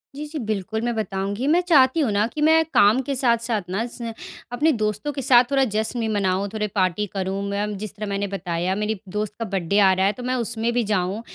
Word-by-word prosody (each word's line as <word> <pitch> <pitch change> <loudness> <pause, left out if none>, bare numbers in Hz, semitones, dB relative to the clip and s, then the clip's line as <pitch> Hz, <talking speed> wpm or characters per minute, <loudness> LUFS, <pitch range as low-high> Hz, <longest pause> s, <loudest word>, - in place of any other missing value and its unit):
जी, 300 +1 -5
जी। 305 0 -6
बिल्कुल, 215 0 -3
मैं 240 0 -1
बताऊँगी। 200 +4 -2
मैं 340 +4 +4
चाहती 300 -4 +4
हूँ 260 -8 +1
ना 205 +1 +2
कि 300 +5 -6
मैं 320 +1 +5
काम 215 +6 +5
के 275 - -1
साथ-साथ 235 -3 +1
ना, 205 +5 -1
स 235 -1 -6 0.4
अपने 310 +5 +3
दोस्तों 215 +3 -2
के 275 - -4
साथ 245 -1 +6
थोड़ा 270 -1 +3
जश्न 220 +3 -1
भी 225 - -1
मनाऊँ, 200 -2 0
थोड़े 210 -1 -1
पार्टी 185 +2 +1
करूँ 195 0 -2
मैं। 205 0 -2
जिस 210 0 -7
तरह 210 0 -5
मैंने 200 0 -1
बताया, 180 -1 -2
मेरी 210 -1 -2
दोस्त 210 +1 -3
का 230 - -2
बर्थडे 195 0 0
आ 190 -2 +6
रहा 190 +1 +1
है, 200 - +3
तो 245 - -9
मैं 255 +1 -1
उसमें 235 -1 -1
भी 240 -1 +1
जाऊँ। 200 0 -1
215 Hz, 235 wpm, -23 LUFS, 200-245 Hz, 0.4 s, साथ